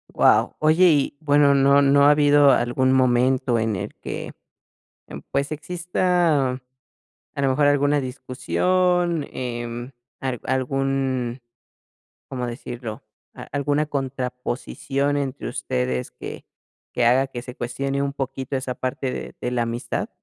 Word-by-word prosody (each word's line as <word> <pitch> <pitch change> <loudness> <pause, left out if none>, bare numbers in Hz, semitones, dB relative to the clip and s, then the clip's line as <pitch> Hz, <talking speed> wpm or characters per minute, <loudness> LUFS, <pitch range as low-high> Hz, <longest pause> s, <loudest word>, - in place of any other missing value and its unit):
Guau. - - +4
Oye, 155 +4 +4
y 145 -1 +1
bueno, 145 -2 +4
¿no 140 +1 +5
no 140 0 +5
ha 145 - +7
habido 145 -1 +5
algún 130 +1 +2
momento 130 -1 +2
en 110 -1 0
el 90 - -5
que, - - -6 0.8
em, - - -8
pues, 140 +2 -1
exista 170 -3 +1 0.8
a 140 - -3
lo 135 - +3
mejor 145 +2 +3
alguna 145 0 +3
discusión, 175 +6 0
em, 120 0 -5 0.3
al 130 -3 -3
algún, 130 -1 -1 0.9
¿cómo 125 -2 -4
decirlo, 120 -2 -7 0.3
a - - -9
alguna 145 +2 0
contraposición 135 +1 -2
entre 140 -1 -3
ustedes 65 0 -2
que 60 - -9 0.5
que 120 - +1
haga 130 +3 +4
que 120 -3 -7
se 125 -1 -10
cuestione 135 +3 -2
un 140 0 -1
poquito 135 -1 -4
esa 130 -1 -3
parte 130 +1 -3
de - - -6
de 125 - -2
la 125 -1 0
amistad? 115 +1 -3
135 Hz, 135 wpm, -23 LUFS, 125-145 Hz, 0.9 s, ha